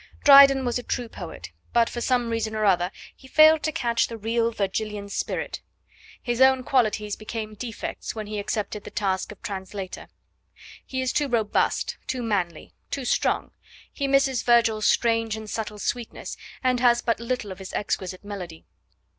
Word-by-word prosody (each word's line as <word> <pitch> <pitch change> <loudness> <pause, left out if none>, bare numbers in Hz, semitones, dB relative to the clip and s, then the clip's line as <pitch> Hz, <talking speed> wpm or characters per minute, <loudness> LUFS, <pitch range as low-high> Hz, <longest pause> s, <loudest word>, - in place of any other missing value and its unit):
Dryden 275 -2 +8
was 245 0 0
a - - -5
true 245 0 -3
poet, - - -9 0.2
but, 235 -1 +4
for 240 - -5
some 245 -2 +1
reason 225 -1 -2
or 215 0 0
other, 180 -2 +3 0.3
he 265 - -16
failed 310 +2 +6
to 310 - -1
catch 235 -5 +1
the 230 - -7
real 230 +2 0
Virgilian 210 0 -3
spirit. - - -3 0.6
His 240 0 -2
own 265 -1 +5
qualities 215 -5 +1
became 215 0 -6
defects 225 +1 -6
when 215 -1 -4
he 210 0 -4
accepted 205 0 -3
the - - -8
task 190 -1 -1
of 210 - -11
a - - -42
translator. 190 -1 -6 0.8
He 260 0 -3
is 255 - -1
too 290 - +1
robust, 225 -5 0
too 255 -2 -2
manly, 185 -7 -2 0.2
too 275 -2 -3
strong. - - 0 0.4
He 280 - -2
misses 270 -3 +3
Virgil's 230 -3 +3
strange 225 -2 +2
and 220 0 -8
subtle 210 -1 -4
sweetness 235 +2 -4 0.3
and 255 -1 +2
has 240 -1 +4
but 230 -2 0
little 235 -3 -3
of 185 - -8
his 190 - -8
exquisite 185 -1 -3
melody. 180 -6 -7
225 Hz, 170 wpm, -25 LUFS, 210-250 Hz, 0.8 s, Dryden